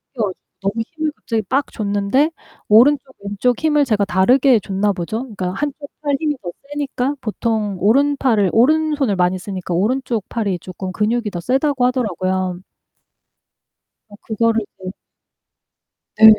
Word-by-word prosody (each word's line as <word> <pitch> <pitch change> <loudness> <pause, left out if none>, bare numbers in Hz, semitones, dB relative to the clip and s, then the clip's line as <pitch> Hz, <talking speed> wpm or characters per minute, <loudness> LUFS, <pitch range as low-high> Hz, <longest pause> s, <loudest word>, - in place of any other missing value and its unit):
껴주 205 -5 -1 0.3
너무 195 +3 -1 0.2
힘을 310 -1 -1
갑자기 225 -2 -2
빡 270 +7 -1
줬는데 205 +9 +1 0.4
오른쪽 265 +4 +5
왼쪽 205 +5 0
힘을 300 -2 +3
제가 210 -4 +1 0.4
다르게 250 -5 +6
줬나 200 +1 0
보죠? 190 +7 -3
그러니까 195 -8 -4
1 290 +6 -1
쪽 285 - -9 0.2
팔 285 -1 +2
힘이 300 -2 0
더 175 - -4 0.2
세니까 285 -1 -2
보통 215 -3 -2
오른팔을 245 -2 +3
오른손을 290 -2 +3
많이 180 +1 +2
쓰니까 185 -2 -5
오른쪽 230 +3 0
팔이 200 -6 -1
쪼끔 185 +1 -6
근육이 215 +2 0
더 175 - -4
세다고 270 - +1
하더라고요. 185 -7 -1 1.5
어 205 - -14
그거를 230 0 +1 0.2
이제 185 0 -6 1.3
네. 220 - +7
225 Hz, 300 characters per minute, -19 LUFS, 195-270 Hz, 1.5 s, 네